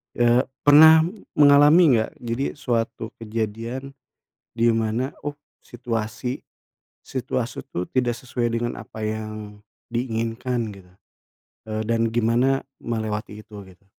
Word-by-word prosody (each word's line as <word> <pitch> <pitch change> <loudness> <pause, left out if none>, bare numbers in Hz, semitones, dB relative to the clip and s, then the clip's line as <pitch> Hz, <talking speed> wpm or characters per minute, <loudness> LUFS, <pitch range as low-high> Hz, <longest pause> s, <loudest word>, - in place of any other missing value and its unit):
Eee, 120 +1 +3 0.2
pernah 160 +2 +8 0.3
mengalami 145 0 +6
nggak, 110 - -1
jadi 120 +3 -2
suatu 115 -5 -2
kejadian 115 +4 -4 0.6
di 115 0 +2
mana, 115 +2 0 0.2
oh, 145 - -2 0.3
situasi, 120 +1 -4 0.6
situasi 125 -2 -4
tuh 90 +1 -3
tidak 125 -2 +1
sesuai 120 -1 -3
dengan 120 +1 -2
apa 110 0 -9
yang 110 -1 -5 0.3
diinginkan 120 0 -2
gitu, 95 -3 -14 0.8
eee, 110 0 -3
dan 115 0 +2
gimana 120 +4 +2 0.2
melewati 110 -2 -4
itu 105 -2 -11
gitu? 95 +1 -19
115 Hz, 110 wpm, -23 LUFS, 110-125 Hz, 0.8 s, pernah